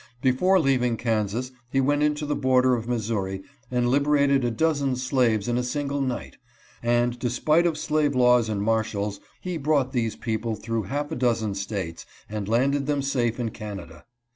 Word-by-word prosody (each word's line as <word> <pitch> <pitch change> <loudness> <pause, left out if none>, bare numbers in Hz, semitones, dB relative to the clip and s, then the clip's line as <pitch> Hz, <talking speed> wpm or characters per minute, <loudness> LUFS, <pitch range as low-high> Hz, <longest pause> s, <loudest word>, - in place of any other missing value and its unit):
Before 135 +10 +3
leaving 125 -6 +2
Kansas 115 +2 -1 0.2
he 135 - +1
went 145 +2 +2
into 150 0 +1
the 145 - -1
border 130 -1 +3
of 115 -1 -2
Missouri 105 -5 -2 0.3
and 125 -1 +1
liberated 140 0 +3
a 120 - +1
dozen 140 +1 +1
slaves 125 -4 +1
in 120 0 +1
a - - -1
single 140 +2 -2
night, 130 -2 -3 0.4
and 120 +1 +1
despite 155 +8 +2
of 160 -2 -1
slave 150 -3 +1
laws 125 -2 +4
and 100 -2 -1
marshals 105 -2 -1 0.2
he 180 -2 -3
brought 140 -3 +1
these 115 -5 -1
people 110 0 -2
through 115 -1 -3
half 145 +2 -2
a - - -2
dozen 115 -4 0
States 95 -4 -5 0.2
and 105 -1 -4
landed 135 +4 +2
them 145 -2 0
safe 125 -4 0
in 120 -2 -1
Canada. 100 -7 -8
125 Hz, 170 wpm, -25 LUFS, 110-140 Hz, 0.4 s, laws